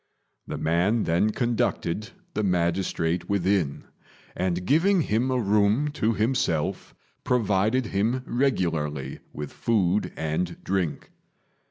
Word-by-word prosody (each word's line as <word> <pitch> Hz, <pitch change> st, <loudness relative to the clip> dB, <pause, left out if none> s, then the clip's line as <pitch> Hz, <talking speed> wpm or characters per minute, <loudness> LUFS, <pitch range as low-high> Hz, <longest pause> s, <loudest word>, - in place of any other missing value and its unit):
The -, -, -4 dB
man 90 Hz, +8 st, +1 dB
then 85 Hz, +6 st, +2 dB
conducted 110 Hz, -3 st, -1 dB, 0.2 s
the -, -, -1 dB
magistrate 85 Hz, -2 st, 0 dB
within, 95 Hz, -6 st, +1 dB, 0.5 s
and 90 Hz, 0 st, -1 dB
giving 175 Hz, -, +4 dB
him 115 Hz, +3 st, 0 dB
a 130 Hz, -, +1 dB
room 105 Hz, +6 st, +2 dB
to 115 Hz, -6 st, 0 dB
himself, 105 Hz, -, -1 dB, 0.3 s
provided 110 Hz, +1 st, +2 dB
him 110 Hz, +5 st, 0 dB
regularly 80 Hz, -, -1 dB
with 75 Hz, -1 st, -7 dB
food 105 Hz, -3 st, +1 dB
and 80 Hz, +3 st, -2 dB
drink. 90 Hz, -5 st, -2 dB
100 Hz, 110 wpm, -26 LUFS, 85-115 Hz, 0.5 s, giving